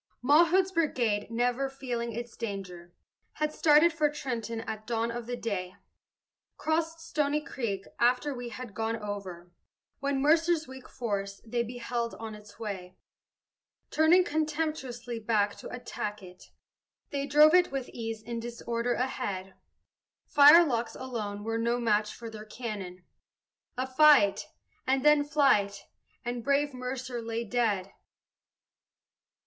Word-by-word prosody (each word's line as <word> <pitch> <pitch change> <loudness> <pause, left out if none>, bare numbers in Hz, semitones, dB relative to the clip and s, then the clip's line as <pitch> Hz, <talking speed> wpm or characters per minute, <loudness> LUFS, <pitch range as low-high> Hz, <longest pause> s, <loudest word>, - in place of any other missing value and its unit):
Mawhood's 340 +7 +5
brigade, 240 - 0
never 245 +3 0
feeling 245 -3 -4
its 235 +1 -6
danger, 185 -6 -6 0.4
Had 305 0 -2
started 310 +2 +5
for 305 -3 +2
Trenton 235 -6 -4
at 215 -1 -6
dawn 230 0 0
of 235 0 -6
the 245 - -2
day, 185 -6 -3 0.8
Crossed 325 +1 -1
Stony 300 -2 0
Creek, 225 -9 -4
after 250 +4 +2
we 245 -2 -6
had 240 -2 -8
gone 225 +1 -1
over, 200 -5 -6 0.5
When 275 0 0
Mercer's 320 +2 +3
weak 260 0 -11
force 200 -5 -3
they 235 +1 -1
beheld 235 0 -3
on 220 -1 -7
its 210 -1 -13
way; 190 -4 -6 0.9
Turning 325 +4 +5
contemptuously 300 -7 -2
back 210 -2 +1
to - - -9
attack 210 -4 -5
it, 180 0 -13 0.7
They 280 0 -2
drove 300 +2 +6
it 360 0 +5
with 270 -2 -3
ease 225 -2 -5
in 235 +1 -4
disorder 235 0 -2
ahead 200 -7 -3 0.7
Firelocks 285 -6 +6
alone 215 -6 -5
were 225 +1 -2
no 235 +1 +1
match 210 -2 +1
for 235 - -8
their 215 -1 -8
cannon 205 -6 -6 0.7
A 255 - 0
fight, 265 -6 +5 0.4
and 265 +1 +1
then 300 -1 +6
flight, 270 -10 +2 0.4
and 240 -1 -3
brave 280 +1 +1
Mercer 250 -1 -4
lay 230 0 -3
dead. 210 -5 0
240 Hz, 130 wpm, -29 LUFS, 215-280 Hz, 0.9 s, drove